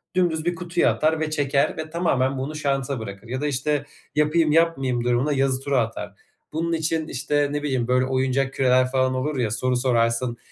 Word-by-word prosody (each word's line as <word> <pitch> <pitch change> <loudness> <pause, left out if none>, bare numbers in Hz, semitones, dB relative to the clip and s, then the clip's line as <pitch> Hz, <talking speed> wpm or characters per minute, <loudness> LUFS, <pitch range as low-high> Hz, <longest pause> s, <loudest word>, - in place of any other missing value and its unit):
Dümdüz 170 -3 +1
bir 175 0 0
kutuya 175 0 +1
atar 155 +1 +1
ve 155 -1 -1
çeker 145 -1 +1
ve 155 0 -5
tamamen 135 -6 0
bunu 140 +4 -4
şansa 140 -3 -1
bırakır. 100 0 -8
Ya 130 +3 -4
da, 150 - 0
işte, 145 +1 -1 0.3
yapayım-yapmayayım 150 -5 +2
durumuna 125 +4 +1
yazı 135 -1 +1
turu 140 0 0
atar. 110 -3 -2 0.4
Bunun 165 +1 -1
için, 160 0 -1
işte, 145 +2 0
ne 145 0 -2
bileyim, 130 -5 -1
böyle 125 0 +2
oyuncak 130 +1 0
küreler 130 -1 +3
falan 130 -1 +2
olur 135 +2 -2
ya, 115 -4 0
soru 125 +3 0
sorarsın 120 -1 +1
135 Hz, 185 wpm, -23 LUFS, 130-155 Hz, 0.4 s, küreler